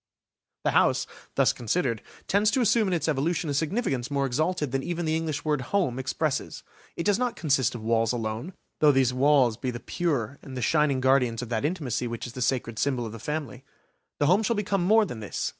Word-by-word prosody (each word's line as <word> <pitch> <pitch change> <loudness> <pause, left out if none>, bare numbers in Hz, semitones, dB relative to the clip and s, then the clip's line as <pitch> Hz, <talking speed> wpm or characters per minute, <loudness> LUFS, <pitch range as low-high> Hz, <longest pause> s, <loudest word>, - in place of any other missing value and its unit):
The - - +2
house, - - +3 0.3
thus - - +4
considered, 120 -2 -1 0.3
tends 205 +2 +3
to 255 - +1
assume 225 -1 +3
in 185 - 0
its 165 - -1
evolution 155 +2 0
a - - -1
significance 145 - -1
more 140 -1 0
exalted 150 +2 -1
than 135 0 0
even 175 +3 -3
the 160 0 +1
English 160 -3 -3
word 150 -3 +1
"home" 130 -3 0
expresses. 135 +2 -2 0.3
It 170 - -3
does 205 +2 +2
not 250 -2 0
consist 135 -7 +1
of 115 - -7
walls 115 0 +2
alone, 115 - -3 0.3
though 150 -1 +6
these 130 -2 +2
walls 130 -3 +3
be 130 - -3
the 120 -1 -4
pure 140 -5 -2
and 130 -2 -7
shining 150 -4 +2
guardians 125 -3 +2
of 120 - -8
that 115 +3 -1
intimacy 140 -8 -2
which 115 -1 -5
is 120 - -8
the 125 - -6
sacred 115 -3 -1
symbol 130 -4 0
of 110 - -6
the 115 - -8
family. 145 -2 -4 0.5
The 145 - +1
home 185 +8 +4
shall 230 +2 0
become 200 -2 0
more 215 +4 +5
than 125 - -7
this. 105 - -3
140 Hz, 210 wpm, -26 LUFS, 125-170 Hz, 0.5 s, though